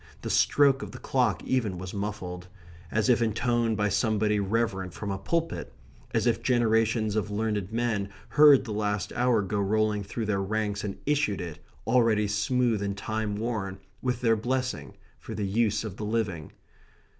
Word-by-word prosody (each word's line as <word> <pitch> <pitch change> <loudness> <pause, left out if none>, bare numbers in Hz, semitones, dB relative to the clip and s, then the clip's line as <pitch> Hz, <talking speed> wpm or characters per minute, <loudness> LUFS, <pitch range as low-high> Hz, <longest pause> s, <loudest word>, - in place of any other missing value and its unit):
The - - -2
stroke 140 -2 +4
of 105 0 -7
the - - -7
clock 125 0 0
even 115 -8 0
was 90 0 -7
muffled; 95 -3 -5 0.4
as 110 +4 +1
if 120 -2 +4
intoned 115 0 +1
by 105 +1 +1
somebody 105 0 +1
reverent 95 -3 -1
from 100 -2 -4
a 95 - -3
pulpit; 165 -1 -2 0.4
as - - +1
if - - +2
generations 115 -3 +2
of 105 -1 -1
learned 105 -2 -2
men 115 -4 -1 0.2
heard 145 -3 +7
the 110 - -5
last 105 -2 -1
hour 120 -3 +2
go 100 +2 -2
rolling 105 +1 +1
through 110 +3 -4
their 100 -2 0
ranks 105 0 -2
and 100 -2 -4
issued 145 -9 +1
it, 85 -4 -6 0.3
already 115 -3 +3
smooth 115 +1 +1
and 100 0 -2
time 110 0 -2
worn, 105 -3 -3 0.2
with 125 -1 -1
their 115 -2 +4
blessing, 125 +3 -2 0.2
for - - -7
the 105 - -2
use 110 +1 +1
of 105 -3 -6
the 105 - -4
living. 105 -8 -2
110 Hz, 170 wpm, -27 LUFS, 100-120 Hz, 0.4 s, heard